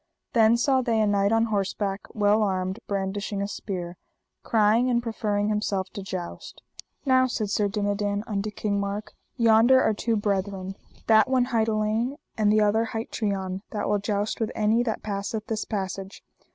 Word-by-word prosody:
Then 225 0 +5
saw 260 +2 +2
they 230 -3 +1
a 215 - +3
knight 200 0 +2
on 225 0 +3
horseback 200 -2 -2
well 210 0 +3
armed, 190 -2 -1
brandishing 200 +1 -2
a 200 - -1
spear, 180 -4 -5 0.4
crying 225 +3 +3
and 240 -1 +2
proffering 210 -3 -1
himself 200 -3 -1
to 200 - -6
joust. 185 -2 -7 0.4
Now, 260 -1 +4
said 215 -5 -2
Sir 205 0 +2
Dinadan 205 0 -1
unto 210 -1 -2
King 205 -1 -2
Mark, 200 +1 -4 0.2
yonder 230 +2 +6
are 220 - +2
two 230 +2 -1
brethren, 195 -2 -2 0.3
that 220 +2 +5
one 255 -2 +3
hight 225 -1 +2
Alein, 220 +4 0 0.2
and 215 -2 +2
the 215 0 +4
other 215 +2 +3
hight 225 0 -5
Trian, 190 -3 -2
that 210 - -3
will 205 0 +2
joust 205 +1 -2
with 225 - 0
any 220 +2 +2
that 230 -3 -2
passeth 210 +1 -3
this 220 -1 -3
passage. 195 -1 -5
210 Hz, 170 wpm, -26 LUFS, 200-225 Hz, 0.4 s, yonder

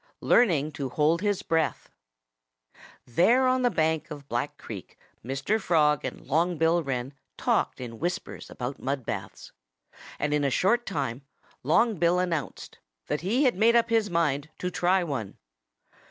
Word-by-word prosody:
XXII - - -10
LEARNING 160 - +4
TO 140 -3 -4
HOLD 155 +6 +2
HIS 205 -2 0
BREATH 160 -3 -1 1.1
There 205 - +3
on 255 0 +2
the 245 - +3
bank 160 -5 0
of 145 -3 -9
Black - - -3
Creek - - -9 0.3
Mr. 135 - -1
Frog 150 -5 +2
and - - -6
Long 165 +5 +1
Bill 165 +2 +3
Wren 135 -2 -3 0.2
talked - - 0
in 115 -3 -7
whispers 180 +3 -4
about 125 +2 -5
mud 135 -2 -2
baths. 95 -1 -6 0.7
And 150 0 -1
in 150 -1 +1
a 140 - +2
short 235 - +1
time 135 -8 -3 0.4
Long 210 - +2
Bill 170 +1 +3
announced 175 -5 -3 0.3
that 150 +1 -2
he 225 - +1
had 255 - +4
made 225 +5 +3
up 230 0 +3
his 225 -2 +2
mind 155 -4 0
to 180 - -3
try 180 +1 +2
one. 130 - -4
160 Hz, 160 wpm, -27 LUFS, 140-190 Hz, 1.1 s, LEARNING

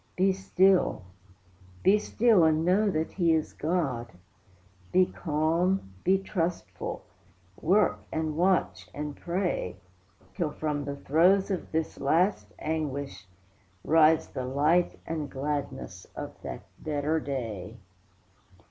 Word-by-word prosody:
Be 190 +1 +3
still, 190 - +2 0.8
be 205 +3 +5
still, 215 -3 +3
and 160 0 +3
know 200 +4 +3
that 160 -3 -1
he 170 -3 +2
is 155 - -2
God; 140 -9 -1 0.8
Be 185 0 +5
calm, 165 - 0
be 190 +1 +4
trustful; 180 -3 -3 0.6
work, 195 +6 +3
and 160 -1 -2
watch, 180 +2 +1
and 150 0 -4
pray, 175 - -2 0.6
Till 170 -5 -1
from 150 -1 -3
the 140 0 -4
throes 180 +8 +3
of 185 - -3
this 160 0 -2
last 160 - +2
anguish 140 - -3 0.6
rise 160 0 +4
The 130 - -4
light 150 +7 +2
and 155 -3 -3
gladness 145 +1 -4
of - - -6
that - - -7 0.2
better 155 +1 0
day. 115 -11 -5
160 Hz, 115 wpm, -28 LUFS, 145-185 Hz, 0.8 s, be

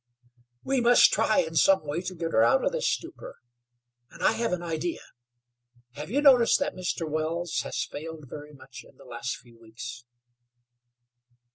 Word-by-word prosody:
"We 270 -2 0
must 240 +1 +6
try 215 - +3
in 160 0 -6
some 190 +2 +4
way 150 +4 -3
to 185 0 -6
get 165 -1 -4
her 110 - +3
out 260 - +3
of - - +1
this - - 0
stupor, 335 0 -6 0.7
and - - -11
I - - +5
have 230 -1 -2
an 180 -1 -2
idea. 165 0 -3 0.9
Have 150 +5 -8
you 285 +7 0
noticed 250 -5 +6
that 285 0 -1
Mr. 180 -2 -3
Wells 160 +2 -2
has - - -3
failed 155 -1 -8
very 150 +3 -9
much 135 - -12
in - - -21
the - - -16
last - - -5
few 120 -2 -20
weeks?" 115 +2 -9
170 Hz, 170 wpm, -27 LUFS, 150-230 Hz, 0.9 s, must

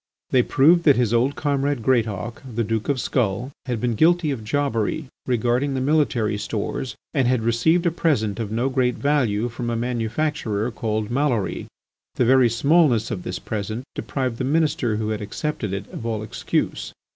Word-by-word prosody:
They 130 - +5
proved 155 +8 +4
that 145 -4 +7
his 120 -2 +1
old 125 +4 +2
comrade 140 -3 -1
Greatauk, 110 -3 0
the 115 - +1
Duke 110 +1 -2
of 140 -2 +1
Skull, 120 +1 -1 0.2
had 120 -3 -1
been 120 +1 0
guilty 160 - +3
of 120 -5 -4
jobbery 140 +2 -1 0.2
regarding 125 +3 +1
the - - 0
military 130 -7 +1
stores 110 +3 -3 0.2
and 135 -5 +2
had 125 -2 +1
received 115 +10 +2
a 170 - +3
present 120 - 0
of 110 -2 -3
no 120 +4 0
great 130 -2 +1
value 125 -7 +1
from 120 0 -4
a 115 - -1
manufacturer 120 0 -1
called 110 -1 -2
Maloury. 125 -6 0 0.5
The 125 - +2
very 130 0 +5
smallness 140 -1 +3
of 90 - -3
this 90 - -4
present 110 +3 -4
deprived 130 -4 -3
the - - -1
Minister 145 -5 +1
who 110 0 -2
had 110 -1 -2
accepted 105 +1 -3
it 100 +1 -4
of - - -6
all 110 -2 -2
excuse. 110 - -2
120 Hz, 175 wpm, -23 LUFS, 110-140 Hz, 0.5 s, that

